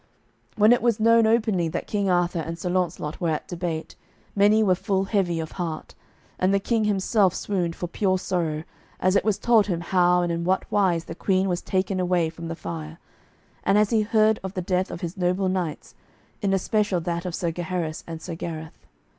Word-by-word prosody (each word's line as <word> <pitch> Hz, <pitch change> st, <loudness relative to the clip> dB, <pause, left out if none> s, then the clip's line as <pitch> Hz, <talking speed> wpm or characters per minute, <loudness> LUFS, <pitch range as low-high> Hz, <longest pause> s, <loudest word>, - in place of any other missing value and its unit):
When 215 Hz, +2 st, +6 dB
it 245 Hz, -, +1 dB
was 235 Hz, -2 st, +2 dB
known 230 Hz, 0 st, +5 dB
openly 220 Hz, -6 st, +2 dB
that 160 Hz, -, -3 dB
King 200 Hz, -2 st, -1 dB
Arthur 175 Hz, -1 st, +1 dB
and 165 Hz, +1 st, -4 dB
Sir 175 Hz, +1 st, -3 dB
Launcelot 175 Hz, -4 st, -2 dB
were 170 Hz, -, +1 dB
at 155 Hz, -, -2 dB
debate, 170 Hz, -2 st, -4 dB, 0.4 s
many 210 Hz, +2 st, +5 dB
were 190 Hz, -3 st, +4 dB
full 190 Hz, +1 st, 0 dB
heavy 190 Hz, -4 st, 0 dB
of 160 Hz, -1 st, -5 dB
heart, 165 Hz, -4 st, -5 dB, 0.5 s
and 185 Hz, +1 st, +2 dB
the 200 Hz, -, +3 dB
King 220 Hz, +2 st, 0 dB
himself 200 Hz, -1 st, +2 dB
swooned 175 Hz, -5 st, -2 dB
for -, -, -4 dB
pure 185 Hz, +2 st, 0 dB
sorrow, 165 Hz, -5 st, -2 dB, 0.4 s
as 185 Hz, +1 st, +2 dB
it -, -, +3 dB
was 210 Hz, -2 st, +1 dB
told 220 Hz, -1 st, +3 dB
him 175 Hz, -4 st, -1 dB
how 180 Hz, 0 st, +3 dB
and 175 Hz, -, -1 dB
in 170 Hz, 0 st, -2 dB
what 185 Hz, +2 st, +1 dB
wise 180 Hz, -5 st, +2 dB
the -, -, -6 dB
Queen 190 Hz, +2 st, +1 dB
was 180 Hz, -1 st, -1 dB
taken 190 Hz, 0 st, -1 dB
away 175 Hz, -3 st, +1 dB
from 165 Hz, 0 st, -8 dB
the 165 Hz, -, -4 dB
fire, 160 Hz, -1 st, -7 dB, 0.7 s
and 200 Hz, -, +3 dB
as 210 Hz, +1 st, +3 dB
he 225 Hz, -2 st, +3 dB
heard 215 Hz, 0 st, +3 dB
of 190 Hz, 0 st, -6 dB
the 185 Hz, -, -1 dB
death 185 Hz, +1 st, 0 dB
of -, -, -7 dB
his 175 Hz, +3 st, -5 dB
noble 180 Hz, +1 st, +1 dB
knights, 175 Hz, -, -3 dB, 0.5 s
in 200 Hz, -, +1 dB
especial 195 Hz, 0 st, +1 dB
that 170 Hz, 0 st, -2 dB
of 180 Hz, -2 st, -4 dB
Sir 170 Hz, -3 st, -1 dB
Gaheris 170 Hz, -1 st, -3 dB
and 165 Hz, -1 st, -7 dB
Sir 175 Hz, -, -5 dB
Gareth. 160 Hz, -1 st, -7 dB
185 Hz, 205 wpm, -24 LUFS, 170-200 Hz, 0.7 s, When